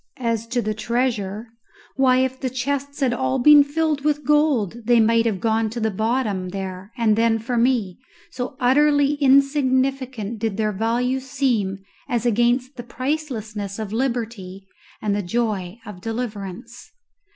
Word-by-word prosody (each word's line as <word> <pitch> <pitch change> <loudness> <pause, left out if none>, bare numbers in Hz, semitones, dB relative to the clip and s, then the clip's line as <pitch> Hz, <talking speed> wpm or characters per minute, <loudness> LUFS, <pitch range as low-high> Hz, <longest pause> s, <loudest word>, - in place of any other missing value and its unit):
As 230 -2 -2
to 245 0 -1
the 215 +1 -1
treasure, 225 -2 -2 0.5
why, 255 -1 +4
if 260 0 -5
the 260 - -2
chests 280 +3 -3
had 255 -3 +2
all 260 +2 0
been 290 +3 +7
filled 300 0 -1
with 295 -1 0
gold, 290 - +2
they 240 0 +4
might 230 +1 +3
have 205 -4 -1
gone 225 +1 +1
to 235 +2 -5
the 220 -1 0
bottom 215 -3 -1
there 190 +1 -6
and 225 -3 +3
then 225 0 +2
for 230 +3 -4
me, 235 -6 +1 0.3
so 255 0 -5
utterly 285 +2 +3
insignificant 265 -4 +2
did 215 -2 -2
their 215 -1 0
value 240 +5 0
seem 235 -8 -1 0.3
as 240 -1 -1
against 240 +3 +1
the 240 - -6
pricelessness 235 -7 -4
of 215 -2 -5
liberty 225 -6 -3 0.4
and 205 -1 +1
the 205 - 0
joy 200 -2 -2
of 205 -5 -10
deliverance. 225 -1 -6
235 Hz, 150 wpm, -22 LUFS, 215-260 Hz, 0.5 s, been